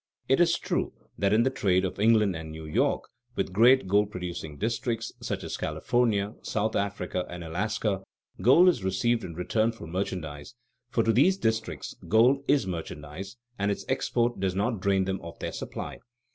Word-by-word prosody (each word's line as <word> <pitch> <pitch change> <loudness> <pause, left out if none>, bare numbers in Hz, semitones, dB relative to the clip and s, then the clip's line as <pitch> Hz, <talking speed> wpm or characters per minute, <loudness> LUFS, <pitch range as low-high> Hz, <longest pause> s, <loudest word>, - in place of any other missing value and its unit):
It 135 - +3
is 170 -1 +4
true - - -2 0.3
that 100 0 +2
in 110 +2 +4
the 130 - +2
trade 95 -8 +2
of 95 - -4
England 105 -3 +4
and 80 0 -6
New 80 0 -8
York 75 - +1 0.3
with 95 - -2
great 120 +4 +6
gold 100 +2 +3
producing 85 -6 -6
districts, 115 - -2
such - - -3
as - - -4
California, 105 +6 0
South 110 +1 -1
Africa, 100 -2 -1
and 85 0 -7
Alaska, 100 +3 -1 0.4
gold 135 - +7
is 170 - +3
received 115 +5 +1
in 85 - -7
return 110 +6 +1
for 115 - -10
merchandise, 80 0 -4 0.3
for 115 -1 +1
to 115 - +3
these 175 - +4
districts 110 - -2
gold 125 +6 +4
is 140 -6 +3
merchandise 85 +3 -6 0.2
and 100 0 +1
its 100 - -2
export 120 0 0
does 95 -1 0
not 105 +2 0
drain 95 0 +2
them 95 0 -2
of 85 0 -9
their - - -4
supply. - - -6
100 Hz, 175 wpm, -28 LUFS, 90-115 Hz, 0.4 s, gold